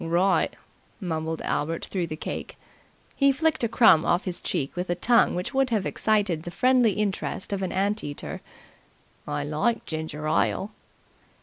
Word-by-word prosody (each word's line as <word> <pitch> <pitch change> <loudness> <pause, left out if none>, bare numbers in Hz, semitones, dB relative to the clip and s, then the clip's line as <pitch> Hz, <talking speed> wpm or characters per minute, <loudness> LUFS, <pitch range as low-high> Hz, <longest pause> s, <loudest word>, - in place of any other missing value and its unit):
"Wri'!" 175 +3 +2 0.5
mumbled 160 -4 -3
Albert 165 +3 -2
through 180 -3 -2
the 155 - -5
cake. - - -6 0.6
He 275 -1 +4
flicked 310 0 0
a - - +3
crumb 225 -8 +6
off 175 - +1
his 180 -2 -3
cheek 135 - -2
with 180 0 -3
a 175 - +1
tongue 235 +7 +3
which 180 +9 -3
would 270 -1 +2
have 215 -5 0
excited 205 -7 +1
the 175 - -7
friendly 250 +3 +3
interest 205 -1 -2
of 195 - -2
an 190 - -2
ant 200 +3 0
eater. 145 0 -6 0.9
"I 145 - -2
like 155 +11 0
ginger 155 -1 -4
ile." 195 +6 +1
185 Hz, 165 wpm, -26 LUFS, 160-220 Hz, 0.9 s, crumb